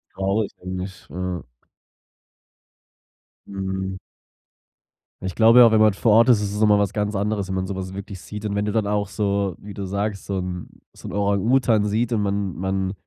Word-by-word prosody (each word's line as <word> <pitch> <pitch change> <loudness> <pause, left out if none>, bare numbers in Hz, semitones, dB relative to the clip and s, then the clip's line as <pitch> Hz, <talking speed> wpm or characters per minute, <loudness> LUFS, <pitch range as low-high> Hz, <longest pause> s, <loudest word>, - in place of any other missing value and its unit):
Traurig, 100 +2 0
finde 90 0 -5
ich, 95 -1 -12
ja. 90 +2 -4 2.0
Mhm. 95 -1 -4 1.2
Ich 95 -1 -4
glaube 115 +2 +6
ja, 115 -2 +8
wenn 110 - +4
man 110 -1 +5
vor 110 +2 +1
Ort 115 +4 +6
ist, 115 -4 +5
ist 100 -1 -2
es 105 - -3
noch 110 - +4
mal 105 -1 +5
was 100 -1 +1
ganz 105 0 -1
anderes, 100 -1 -1
wenn 95 - -3
man 95 0 -2
sowas 95 -1 -5
wirklich 100 0 -7
sieht 105 +3 -8
und 105 - -2
wenn 105 0 0
du 105 - -2
dann 110 -2 +1
auch, 105 0 0
so 100 -2 -1
wie 100 0 -10
du 100 0 -5
sagst 100 +1 -3
so 100 -1 -2
'n 90 -1 -5 0.3
so - - -11
'n - - -7
Orang-Utan 105 +3 +2
sieht 110 +3 0
und 110 -3 +1
man 100 -2 -1
man 95 +1 -1
100 Hz, 195 wpm, -23 LUFS, 95-105 Hz, 2.0 s, ja